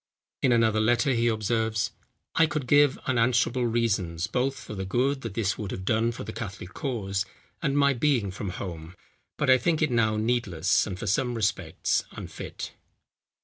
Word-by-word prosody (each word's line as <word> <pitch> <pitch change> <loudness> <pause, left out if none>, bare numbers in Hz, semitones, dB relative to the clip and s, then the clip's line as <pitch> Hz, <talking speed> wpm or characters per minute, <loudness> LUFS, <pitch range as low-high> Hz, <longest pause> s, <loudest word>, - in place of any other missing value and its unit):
In 130 - +3
another 115 -2 +3
letter 120 +5 +3
he 120 0 +2
observes: 110 0 0 0.4
"I 165 - +4
could 150 -3 -3
give 145 +1 +5
unanswerable 125 0 +2
reasons, 100 -8 0
both 130 +5 0
for - - -8
the 95 -2 -4
good 130 +8 0
that 115 -6 -6
this 105 -3 0
would 105 -3 -4
have 95 - -5
done 115 +2 +2
for 120 - -7
the 110 +2 -6
Catholic 100 -3 -7
cause, 100 -9 -2 0.4
and 140 +1 0
my 140 -1 +4
being 120 -6 +1
from 95 +1 -5
home, 85 -2 -6 0.4
but 150 - 0
I 130 0 +6
think 160 +5 +1
it 155 -4 +1
now 110 -2 +2
needless, 105 -7 +1
and 95 -3 -4
for 105 - -5
some 120 +4 +1
respects 110 -3 0
unfit." - - -7
115 Hz, 175 wpm, -27 LUFS, 100-130 Hz, 0.4 s, I